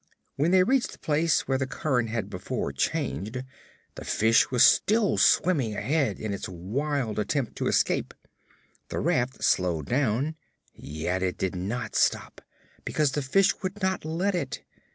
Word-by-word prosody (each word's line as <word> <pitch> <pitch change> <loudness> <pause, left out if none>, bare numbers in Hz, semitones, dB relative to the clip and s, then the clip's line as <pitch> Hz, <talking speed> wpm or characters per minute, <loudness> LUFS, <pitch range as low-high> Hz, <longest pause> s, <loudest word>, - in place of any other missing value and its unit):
When 150 +4 +1
they 185 0 +5
reached 260 +4 +1
the - - -13
place 155 +2 +1
where 135 -1 +1
the 130 - -1
current 130 -6 -1
had 115 -1 -2
before 70 - -4
changed, 95 - -2 0.5
the - - -9
fish 115 +1 +3
was 125 -2 +4
still 215 -1 +4
swimming 140 - +3
ahead 145 +3 0
in 110 -2 -3
its 100 - -5
wild 110 - -2
attempt 125 +3 -2
to - - -1
escape. - - 0 0.7
The - - -4
raft 125 +2 0
slowed 85 -5 +1
down, 135 - 0 0.4
yet 80 +5 -4
it 95 -1 -1
did 95 -1 -2
not 110 +6 -4
stop, - - 0 0.4
because 150 -3 0
the 145 - -2
fish 180 +9 +2
would 190 +1 -4
not 190 0 0
let 170 +6 -1
it. 135 -10 -3
130 Hz, 155 wpm, -26 LUFS, 105-155 Hz, 0.7 s, they